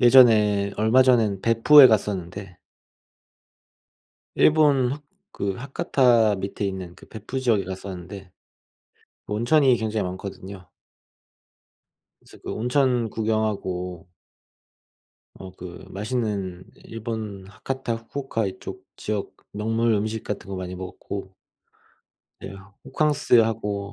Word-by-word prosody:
예전에 110 -5 +5
얼마 110 +5 +4
전에는 115 -7 +2
벳푸에 120 +6 +7
갔었는데 95 -4 -2 1.8
일본 145 -5 +4
하 145 - -5 0.3
그 100 -1 -2
하카타 120 -4 +2
밑에 100 +2 -4
있는 95 -3 -5
그 - - -16
벳푸 110 +5 -6
지역에 115 -6 +2
갔었는데 95 0 -8 1.0
온천이 125 +6 +3
굉장히 110 -2 -2
많거든요. 95 0 -8 1.5
그래서 - - -17
그 - - -6
온천 125 -1 +1
구경하고 100 -5 -2 1.3
어 95 -1 -10
그 90 -1 -10
맛있는 100 -4 -3 0.2
일본 110 -4 -6
하카타 130 +3 -4
후쿠오카 115 -2 -4
이쪽 95 - -8
지역 105 -2 -4 0.2
명물 115 +2 0
음식 110 +2 -2
같은 105 -1 -6
거 100 - -5
많이 90 0 -5
먹었고 95 +1 -7 1.1
네. 95 +1 -8 0.3
호캉스하고 115 -8 +1
105 Hz, 230 characters per minute, -24 LUFS, 95-120 Hz, 1.8 s, 벳푸에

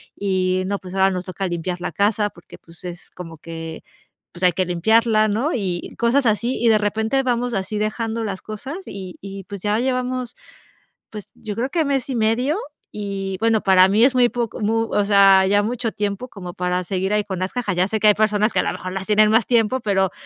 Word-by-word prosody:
y 185 -2 0
no, 200 0 -2
pues 185 0 -9
ahora 190 0 +4
nos 180 -1 -4
toca 195 +1 -4
limpiar 175 +1 -3
la - - -3
casa 210 0 +1
porque, 175 - -15
pues 165 +1 -14
es 175 0 -8
como 165 -3 -9
que, 165 0 -8 0.5
pues 175 +1 -8
hay 180 -2 +5
que 185 +1 +1
limpiarla", 215 +5 +3
¿no?, 235 +9 0
y 185 -6 -3
cosas 245 +4 +2
así. 235 +4 0
Y 230 - +5
de 215 - +5
repente, 220 +5 0
vamos 245 -1 0
así 195 +2 -2
dejando 225 +1 -2
las 195 -3 -4
cosas 260 - -6
y 190 -2 -8
y 195 0 -8
pues 200 -2 -8
ya 210 +2 +1
llevamos, 255 -1 -2 0.8
pues 210 -2 -9
yo 210 -2 -6
creo 255 +4 -1
que 330 -3 +1
mes 275 -2 -1
y - - -2
medio 235 - +1 0.4
y 195 -2 -3
bueno, 225 -1 +3
para 190 -1 +6
mí 215 +4 +4
es 260 - +4
muy 250 -1 +5
poco 235 -2 -3
mu 225 +2 0
o 205 - +2
sea, 195 -2 +6
ya 205 +1 +3
mucho 230 +1 -2
tiempo 205 +3 -3
como 180 -6 -9
para 180 0 -1
seguir 190 +2 -2
ahí 210 -1 +1
con 190 -2 -5
las 185 - -2
cajas. 215 -7 -2
Ya 180 - +3
sé 220 0 -2
que 215 - +5
hay 210 - +6
personas 215 0 +2
que - - +2
a - - -1
lo - - -1
mejor 185 - -6
las 195 0 -4
tienen 215 0 +4
más 225 -1 +3
tiempo, 235 +1 +2
pero 195 -3 +1
205 Hz, 225 wpm, -21 LUFS, 190-230 Hz, 0.8 s, para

